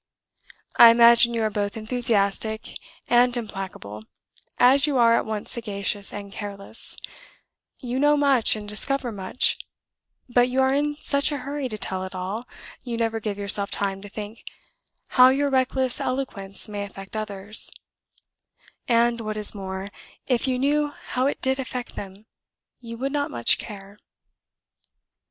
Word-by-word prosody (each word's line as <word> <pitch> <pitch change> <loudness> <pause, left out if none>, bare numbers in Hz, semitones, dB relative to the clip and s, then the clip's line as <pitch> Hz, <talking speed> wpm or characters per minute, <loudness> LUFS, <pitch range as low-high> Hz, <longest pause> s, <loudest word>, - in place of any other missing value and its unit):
I 235 - +10
imagine 235 0 +6
you 225 - 0
are 215 - 0
both 205 +1 -3
enthusiastic 220 -2 0 0.3
and 245 0 +3
implacable, 190 - -7 0.5
as 270 +4 +5
you 285 -3 0
are 230 -1 +5
at - - -1
once 215 -1 -4
sagacious 205 -3 -1
and 200 -1 -8
careless; 200 +1 -5 0.9
you 250 +1 -2
know 295 +1 +4
much 275 -6 +3
and 210 -1 -7
discover 245 +4 0
much, 195 +3 -1 0.7
but 245 0 +3
you 255 +1 -1
are 265 0 +3
in 295 +1 0
such 280 +1 +1
a 290 - -2
hurry 280 -2 -3
to 215 - -4
tell 190 -2 -2
it 190 0 -7
all 195 +6 -5 0.3
you 240 -2 -5
never 225 -1 -1
give 210 -2 -4
yourself 200 0 +2
time 195 -1 -2
to 205 - -10
think 215 +2 -8 0.7
how 255 0 +7
your 280 +2 +1
reckless 260 -1 0
eloquence 200 -7 -2
may 205 -1 -5
affect 195 0 -10
others; 210 0 +3 1.2
and, 235 0 +2
what 215 -1 -4
is 210 -1 +1
more, 190 -1 -6 0.4
if 250 0 0
you 255 -1 0
knew 295 +3 +1
how 260 -2 -3
it 285 - -3
did 265 +1 +1
affect 250 -2 -5
them, 195 +1 -9 0.5
you 230 -1 -9
would 270 +3 -3
not 290 0 -1
much 120 -1 +2
care. 200 -1 -9
230 Hz, 150 wpm, -24 LUFS, 200-255 Hz, 1.2 s, I